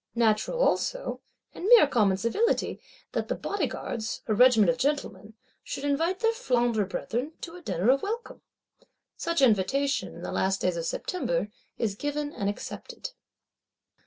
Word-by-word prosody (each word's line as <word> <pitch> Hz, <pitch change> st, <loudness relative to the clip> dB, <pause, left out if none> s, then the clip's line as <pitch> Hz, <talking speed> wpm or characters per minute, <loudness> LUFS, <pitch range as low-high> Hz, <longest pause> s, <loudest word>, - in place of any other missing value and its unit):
Natural 225 Hz, -, +2 dB
also, -, -, 0 dB, 0.3 s
and -, -, -7 dB
mere 475 Hz, -6 st, +9 dB
common 210 Hz, -9 st, +2 dB
civility, 325 Hz, -, 0 dB, 0.3 s
that -, -, -2 dB
the -, -, -1 dB
Bodyguards, 265 Hz, -, -3 dB
a 220 Hz, -, 0 dB
Regiment 245 Hz, -1 st, +6 dB
of 245 Hz, -, -5 dB
Gentlemen, 225 Hz, -7 st, -2 dB, 0.3 s
should -, -, -5 dB
invite 325 Hz, +7 st, 0 dB
their 455 Hz, 0 st, +4 dB
Flandre 240 Hz, -, +1 dB
brethren 250 Hz, +10 st, -3 dB
to 335 Hz, 0 st, -7 dB
a 360 Hz, -, -10 dB
Dinner 215 Hz, -, +2 dB
of 275 Hz, +1 st, +2 dB
welcome!—Such 410 Hz, -, -5 dB
invitation, 265 Hz, +6 st, +2 dB
in -, -, -10 dB
the -, -, -4 dB
last 195 Hz, 0 st, 0 dB
days 180 Hz, -1 st, +1 dB
of 165 Hz, -1 st, -3 dB
September, 255 Hz, -, -2 dB, 0.3 s
is 220 Hz, -4 st, 0 dB
given 290 Hz, +6 st, -3 dB
and 200 Hz, -, -1 dB
accepted. 485 Hz, -, -6 dB
260 Hz, 145 wpm, -27 LUFS, 215-335 Hz, 0.3 s, mere